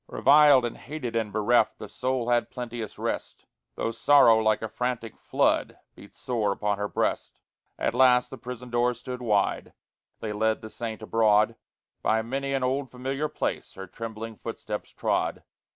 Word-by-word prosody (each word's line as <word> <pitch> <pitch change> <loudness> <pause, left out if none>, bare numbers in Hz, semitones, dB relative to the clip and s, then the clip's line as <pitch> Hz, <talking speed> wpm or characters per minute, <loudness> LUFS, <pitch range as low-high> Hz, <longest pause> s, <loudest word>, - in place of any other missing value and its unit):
Reviled 145 -3 +6
and 120 - -4
hated 135 -6 -6
and 110 -2 -1
bereft, 110 +1 +2
The 105 - -8
soul 130 +1 -2
had 120 -1 +2
plenteous 120 -3 -6
rest, - - -4 0.3
Though 115 - -2
sorrow 130 -3 +6
like 110 -1 +1
a - - -1
frantic 120 0 -3
flood - - 0 0.2
Beat - - -15
sore 110 -5 -1
upon 100 0 -1
her 105 - -1
breast. - - -2 0.4
At - - 0
last 125 -1 +4
the - - -8
prison 125 0 -8
door 120 +1 +2
stood 125 +1 -7
wide, 105 -4 0 0.5
They 110 -1 -4
led 110 +1 0
the 110 - -8
saint 110 -2 -6
abroad; 110 0 +3 0.5
By 110 0 +1
many 135 +4 -3
an 135 - -1
old 130 +1 -1
familiar 135 +4 -3
place - - -3
Her 95 - -7
trembling 115 +2 -7
footsteps 105 -2 -6
trod. - - -1
115 Hz, 165 wpm, -26 LUFS, 110-125 Hz, 0.5 s, Reviled